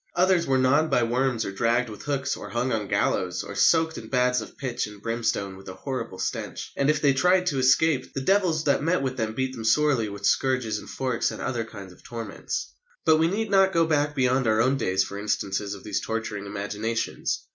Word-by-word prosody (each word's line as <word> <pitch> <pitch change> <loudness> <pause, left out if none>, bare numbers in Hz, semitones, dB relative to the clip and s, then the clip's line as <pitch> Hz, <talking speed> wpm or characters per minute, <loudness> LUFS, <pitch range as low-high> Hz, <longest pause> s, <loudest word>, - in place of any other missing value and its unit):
Others 180 -1 +3
were 135 -1 +3
gnawed 140 +5 +3
by 120 - +3
worms 120 0 0
or 100 - -3
dragged 120 +4 +1
with 105 -2 -9
hooks, 135 -2 -1
or - - -8
hung 125 +2 -1
on 110 -3 -1
gallows, 90 -1 0
or - - -7
"soaked 160 +10 +3
in 110 - -10
baths 125 0 +2
of - - -11
pitch 125 -4 -2
and 105 -1 -12
brimstone 115 -3 -2
with 95 0 -11
a 95 - -8
horrible 130 -4 -5
stench," - - -4
and, 140 +1 +1
if 150 -1 +3
they 140 -2 +5
tried 180 +7 +3
to 145 -7 0
escape, 130 +3 +3
"the - - 0
devils 180 -1 +2
that 140 -2 +2
met 165 0 +1
with 130 -1 -2
them 110 -2 -2
beat 130 +1 -1
them 115 -3 -7
sorely 120 -1 +2
with 100 0 -6
scourges 125 -5 +1
and - - -11
forks 130 -3 -1
and - - -7
other 120 -3 -2
kinds 100 -4 -10
of 90 - -20
torments." 115 - -5 0.3
But 160 - +6
we 160 +1 +3
need 210 +4 -2
not 195 -1 +4
go 165 0 +4
back 150 -2 +1
beyond 130 -1 +2
our 110 0 +3
own 130 +4 +3
days 95 -7 +1
for 100 +1 -6
instances 100 -1 -2
of 100 - -13
these 105 -2 -2
torturing 110 -2 -4
imaginations. 105 +3 -3
125 Hz, 220 wpm, -25 LUFS, 110-145 Hz, 0.3 s, But